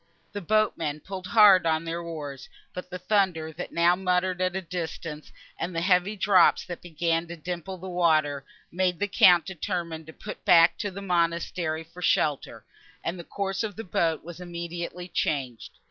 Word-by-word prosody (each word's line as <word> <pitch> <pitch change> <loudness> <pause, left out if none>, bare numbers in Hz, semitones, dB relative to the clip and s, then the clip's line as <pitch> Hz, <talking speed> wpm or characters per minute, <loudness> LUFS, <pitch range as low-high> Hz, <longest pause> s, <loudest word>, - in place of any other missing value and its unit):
The 205 - -5
boatmen 170 -7 0
pulled 185 +1 -7
hard 200 -6 +6
at 160 0 +1
their 165 +1 -3
oars; 145 -6 -7 0.2
but 180 0 -7
the 180 - -5
thunder, 180 -4 0
that - - -7
now 170 +1 +4
muttered 180 0 0
at 185 0 0
a 190 - -1
distance, 165 -3 -6 0.3
and 180 - -4
the 165 - 0
heavy 180 +3 +2
drops, 190 -3 +4
that 175 -2 -7
began 165 0 -1
to 170 - -7
dimple 175 +3 -5
the 185 +2 -9
water, 155 -6 +1 0.3
made 180 0 0
the 205 - -1
Count 180 -3 +6
determine 170 -3 -4
to - - -9
put 210 - -9
back 165 0 +6
to 205 - -2
the 200 +1 -8
monastery 170 -2 -1
for 165 +2 -13
shelter, 150 -4 0 0.4
and 175 +2 -3
the - - -7
course 195 +1 -3
of 215 -4 -3
the 225 - -6
boat 165 -4 0
was 175 +1 -9
immediately 175 0 -6
changed. 130 -9 -2
175 Hz, 175 wpm, -26 LUFS, 165-185 Hz, 0.4 s, hard